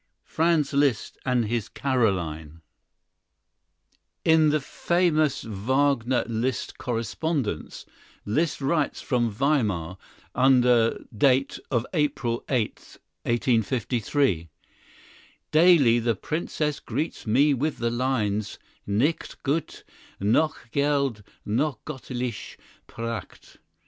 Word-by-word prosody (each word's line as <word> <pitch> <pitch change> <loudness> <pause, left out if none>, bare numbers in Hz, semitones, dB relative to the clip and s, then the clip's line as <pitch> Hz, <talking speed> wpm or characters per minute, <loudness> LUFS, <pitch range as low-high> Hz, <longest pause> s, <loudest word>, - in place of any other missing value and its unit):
Franz 160 -3 +1
Liszt 140 -5 +1
and 125 -3 +2
his 115 0 -2
Carolyne 85 - -1 1.6
In 160 -1 +5
the 155 +1 +2
famous 155 0 +1
Wagner 125 +4 +1
Liszt 120 +2 -2
correspondence, 120 - -3 0.4
Liszt 150 +9 0
writes 145 +2 0
from 120 -3 +1
Weimar, 105 - 0 0.4
under 125 -3 +4
date 135 +4 +2
of 120 -3 0
April 140 -7 0
8, 120 -6 -2 0.3
1853, 120 - 0 1.0
"Daily 155 -8 +6
the 115 -1 0
Princess 150 - -2
greets 135 +1 -4
me 140 +7 +4
with 145 +4 -1
the 115 -1 -1
lines 110 -5 -1 0.3
'Nicht 120 +11 -1
Gut, 145 +3 -2 0.4
noch 120 +4 +1
Geld, 140 -5 +1 0.2
noch 130 +5 0
Göttliche 125 -5 -5 0.3
Pracht.'" 115 0 -7
125 Hz, 90 wpm, -25 LUFS, 115-145 Hz, 1.6 s, Daily